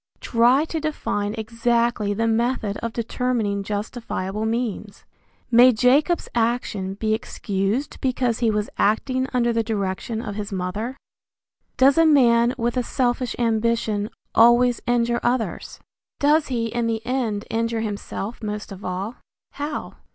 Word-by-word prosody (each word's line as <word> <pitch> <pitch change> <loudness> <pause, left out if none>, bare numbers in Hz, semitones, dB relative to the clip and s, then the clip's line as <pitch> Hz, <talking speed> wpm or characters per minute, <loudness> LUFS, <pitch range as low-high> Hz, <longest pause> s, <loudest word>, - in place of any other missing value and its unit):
Try 245 +5 +3
to 325 0 -3
define 215 -9 -2
exactly 230 -1 0
the 225 +3 0
method 225 -2 0
of 230 - -4
determining 230 -3 -1
justifiable 210 0 -3
means. 220 -3 -3 0.5
May 245 +2 +8
Jacob's 270 +9 +2
action 225 -5 -1
be 215 +1 0
excused 210 +3 -2
because 250 -3 0
he 230 - +2
was 210 -1 0
acting 255 +5 +1
under 240 -2 +1
the 230 - +2
direction 215 0 -3
of 225 - -5
his 210 +1 -5
mother? 200 +7 -3 0.8
Does 275 +4 +5
a 330 - +6
man 240 -4 +4
with 240 +1 -1
a - - +3
selfish 245 0 -1
ambition 225 -2 0 0.2
always 240 +1 +5
injure 240 0 +2
others? 240 -5 -2 0.4
Does 295 +2 +3
he 235 -3 -1
in 230 +1 -1
the 225 0 -2
end 235 -5 -1
injure 230 0 -1
himself 210 +1 -5
most 210 -1 -5
of 195 0 -9
all? 190 +6 -4 0.3
How? 295 +1 -5
230 Hz, 135 wpm, -23 LUFS, 210-245 Hz, 0.8 s, May